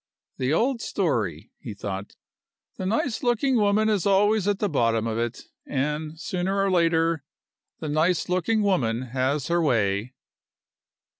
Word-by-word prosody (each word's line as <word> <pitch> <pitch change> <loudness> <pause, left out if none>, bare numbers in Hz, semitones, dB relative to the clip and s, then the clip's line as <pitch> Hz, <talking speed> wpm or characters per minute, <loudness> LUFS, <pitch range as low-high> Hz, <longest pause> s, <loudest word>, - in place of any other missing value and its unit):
"The 130 +1 0
old 235 - +1
story," 110 - -1
he 110 -4 -7
thought. 100 -1 -6 0.6
"The 185 - -3
nice 225 +3 0
looking 250 +1 +2
woman 210 0 +3
is 205 -4 +1
always 205 +1 +3
at 205 -1 +2
the 205 - 0
bottom 115 - +1
of 115 0 -2
it; 120 +1 -3 0.2
and, 150 +3 -2
sooner 185 +1 -2
or 195 0 +2
later, 165 -3 +2 0.6
the 155 - -3
nice 155 +4 +1
looking 185 +5 +1
woman 130 - +1
has 130 +3 -1
her 170 0 +2
way." 115 -4 0
165 Hz, 145 wpm, -25 LUFS, 125-200 Hz, 0.6 s, woman